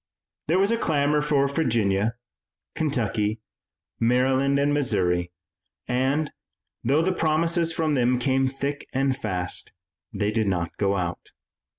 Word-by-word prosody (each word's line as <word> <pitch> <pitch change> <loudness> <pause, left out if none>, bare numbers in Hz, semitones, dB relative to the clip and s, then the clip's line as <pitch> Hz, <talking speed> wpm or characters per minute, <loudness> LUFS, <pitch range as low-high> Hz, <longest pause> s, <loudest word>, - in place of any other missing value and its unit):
There 165 +4 +2
was 200 +3 +3
a 230 - +1
clamor 150 -3 +2
for 145 -2 +2
Virginia, 115 -7 +1 0.6
Kentucky, 110 -7 -1 0.6
Maryland 130 +3 +2
and 145 +1 +2
Missouri, 90 -11 +1 0.6
and, 135 +5 0 0.5
though 140 +7 +2
the 185 +2 +1
promises 165 +1 +1
from 160 -2 0
them 125 -2 +2
came 135 +1 +1
thick 140 +2 -4
and 135 0 +1
fast, 90 -6 -3 0.4
they 105 0 -1
did 110 -1 0
not 85 -3 -1
go 100 -1 +1
out. 90 -1 -4
135 Hz, 125 wpm, -25 LUFS, 105-150 Hz, 0.6 s, was